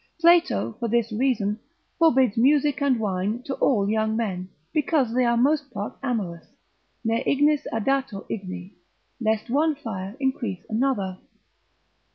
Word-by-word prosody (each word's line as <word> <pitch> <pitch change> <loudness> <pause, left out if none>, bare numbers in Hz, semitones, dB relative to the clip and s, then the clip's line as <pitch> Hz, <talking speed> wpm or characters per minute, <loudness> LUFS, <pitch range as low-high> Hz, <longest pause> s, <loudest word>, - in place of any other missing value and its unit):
Plato 340 -8 +3
for 235 - -1
this 230 0 +1
reason 220 -3 0 0.4
forbids 265 -9 +4
music 285 +4 +3
and 270 -4 +2
wine 205 +3 -1
to 270 - -4
all 205 -7 +2
young 220 +1 +1
men, 185 -5 -3 0.2
because 295 -6 +1
they 255 +1 +3
are 235 0 +2
most 285 +3 +2
part 205 -3 -5
amorous, 205 -11 -3 0.6
ne 225 +2 +1
ignis 290 +1 +2
addatur 255 -2 -1
igni, 185 -1 -6 0.5
lest 220 0 -1
one 305 +3 +2
fire 210 -5 -6
increase 240 -8 -2
another. 215 -6 0
235 Hz, 135 wpm, -25 LUFS, 210-275 Hz, 0.6 s, forbids